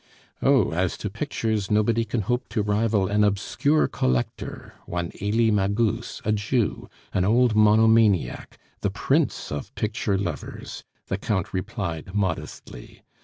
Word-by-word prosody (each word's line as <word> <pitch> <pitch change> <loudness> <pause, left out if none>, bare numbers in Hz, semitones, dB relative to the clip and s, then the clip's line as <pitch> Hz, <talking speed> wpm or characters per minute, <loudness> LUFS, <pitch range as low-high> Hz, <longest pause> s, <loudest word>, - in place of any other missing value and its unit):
"Oh! 135 -7 +4
as 90 +2 -1
to - - -4
pictures, 110 -3 -2
nobody 115 +2 +2
can 115 +1 -1
hope 125 +5 -2
to 105 - -1
rival 105 -1 +1
an 105 +1 +2
obscure 105 +9 +2
collector, 65 -1 -2
one 85 -1 -3
Elie 110 +3 +2
Magus, 105 +3 0
a 110 - +2
Jew, 105 +2 -1 0.2
an 90 - +2
old 115 +3 +3
monomaniac, 110 -2 +3 0.2
the - - 0
prince - - 0
of 75 -1 -5
picture 105 -2 -1
lovers," 100 - -5 0.2
the - - -3
Count 95 -4 -2
replied 95 -3 -4
modestly. 95 -10 -4
105 Hz, 130 wpm, -25 LUFS, 95-115 Hz, 0.2 s, Oh